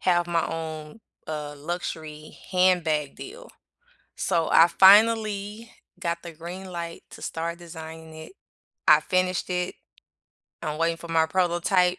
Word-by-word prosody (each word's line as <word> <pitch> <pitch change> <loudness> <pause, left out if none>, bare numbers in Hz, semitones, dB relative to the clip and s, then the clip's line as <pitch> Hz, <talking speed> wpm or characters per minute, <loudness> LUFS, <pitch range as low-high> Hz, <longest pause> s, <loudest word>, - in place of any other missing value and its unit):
have 175 -1 +2
my 170 -1 0
own, 160 +3 -6 0.3
uh, 150 -1 -5
luxury 155 -1 -6
handbag 175 -6 +2
deal, 485 +6 -10 0.7
so 170 -3 0
I 165 - +7
finally 210 +3 +4 0.3
got 170 -2 -2
the 170 - -8
green 175 +4 -8
light 170 -1 -6
to - - -12
start 170 +1 -4
designing 160 -2 -10
it. 160 - -10 0.6
I - - +7
finished 185 -1 0
it, 180 0 -2 0.9
I'm 155 -1 -3
waiting 165 0 +1
for 170 +1 -11
my 165 -1 +3
prototype. 180 +1 +2
170 Hz, 130 wpm, -25 LUFS, 160-185 Hz, 0.9 s, I